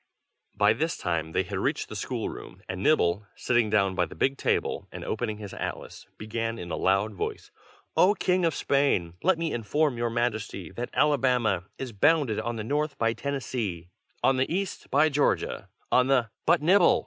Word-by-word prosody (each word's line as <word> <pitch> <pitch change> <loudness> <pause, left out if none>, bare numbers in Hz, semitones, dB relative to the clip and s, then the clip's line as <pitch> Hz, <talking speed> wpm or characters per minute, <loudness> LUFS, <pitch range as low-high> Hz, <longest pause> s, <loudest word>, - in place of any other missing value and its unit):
By 105 +1 +4
this 160 +8 -1
time 80 -3 -2
they - - +1
had - - -4
reached - - -1
the - - -8
school - - -3
room, - - -9
and 90 0 -4
Nibble, 105 - +2
sitting 120 -3 +1
down 100 -3 +2
by - - +1
the - - -11
big 135 +1 +1
table - - -1
and - - -7
opening 110 -3 -2
his 105 -2 -8
atlas, - - -6
began, 115 +1 -3
in 85 -5 -7
a - - -1
loud 100 +3 +1
voice: 95 - -5 0.4
"O 200 +3 +5
King 185 -1 +1
of 165 -3 +2
Spain, 135 -12 +1
let 185 -1 +3
me 165 -1 -2
inform 125 +4 0
your 120 0 0
Majesty 110 -7 -2
that 120 +1 -5
Alabama 125 -10 +2
is 130 -2 -5
bounded 145 0 +3
on 120 0 -3
the 110 - -4
north 150 +5 -1
by 115 0 +1
Tennessee, 115 -11 -4 0.3
on 135 - +4
the 130 +3 0
east 190 +2 -3
by 145 +3 +4
Georgia, 145 0 0 0.2
on 125 0 +4
the" 125 -5 +2 0.2
"But, - - +4
Nibble! 180 +2 +5
120 Hz, 185 wpm, -27 LUFS, 105-145 Hz, 0.4 s, O